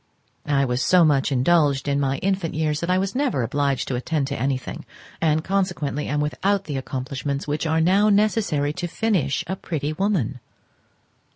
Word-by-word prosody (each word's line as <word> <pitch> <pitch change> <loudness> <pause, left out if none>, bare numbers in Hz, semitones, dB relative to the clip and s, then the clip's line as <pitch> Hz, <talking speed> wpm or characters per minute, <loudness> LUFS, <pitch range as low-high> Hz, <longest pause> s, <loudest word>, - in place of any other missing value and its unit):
I 140 -1 +2
was 125 0 -1
so 180 +2 +5
much 145 -2 +2
indulged 140 0 +2
in 140 0 +1
my 135 -1 0
infant 190 -5 -1
years 155 -1 0
that 170 - -3
I 185 - +3
was 195 +1 -1
never 255 - 0
obliged 140 +1 0
to 130 - -2
attend 145 +3 -1
to 140 - -2
anything, 135 -1 -2 0.4
and 155 -1 +2
consequently 175 -7 -1
am 150 +1 0
without 195 +6 0
the 145 -6 -4
accomplishments 135 +2 -4
which 150 +2 -1
are 160 +1 +2
now 195 +5 +4
necessary 200 -8 +1
to 175 +2 -4
finish 170 - 0
a 190 - -3
pretty 155 -5 -3
woman. 155 - -1
150 Hz, 175 wpm, -23 LUFS, 140-185 Hz, 0.4 s, so